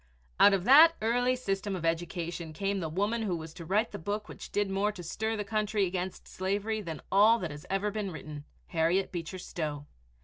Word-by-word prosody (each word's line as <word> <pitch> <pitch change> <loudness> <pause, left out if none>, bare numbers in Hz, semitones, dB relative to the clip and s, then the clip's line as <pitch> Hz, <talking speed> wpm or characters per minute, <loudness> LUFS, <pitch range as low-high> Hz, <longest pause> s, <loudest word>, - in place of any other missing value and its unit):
Out 205 - +7
of 185 - -2
that 310 - +8
early 245 +3 +2
system 195 -5 -2
of 170 -3 -4
education 170 0 -2
came 195 +4 -1
the 165 -3 -3
woman 205 +8 0
who 195 -5 -1
was 160 -1 -7
to 170 - -9
write 210 +7 +1
the - - -6
book 210 +5 -3
which - - -10
did 205 0 +1
more 195 +2 0
to 190 -4 -9
stir 220 +6 -2
the 210 - -2
country 210 -1 0
against 185 0 -4
slavery 205 +3 -2
than 165 -6 -7
all 210 +4 +6
that 175 -8 -4 0.2
ever 195 +1 0
had 205 - -2
been 210 -2 -2
written, 150 -2 -8 0.2
Harriet 170 +3 +1
Beecher 175 +1 -5
Stowe. 150 -5 -4
195 Hz, 205 wpm, -30 LUFS, 170-210 Hz, 0.2 s, that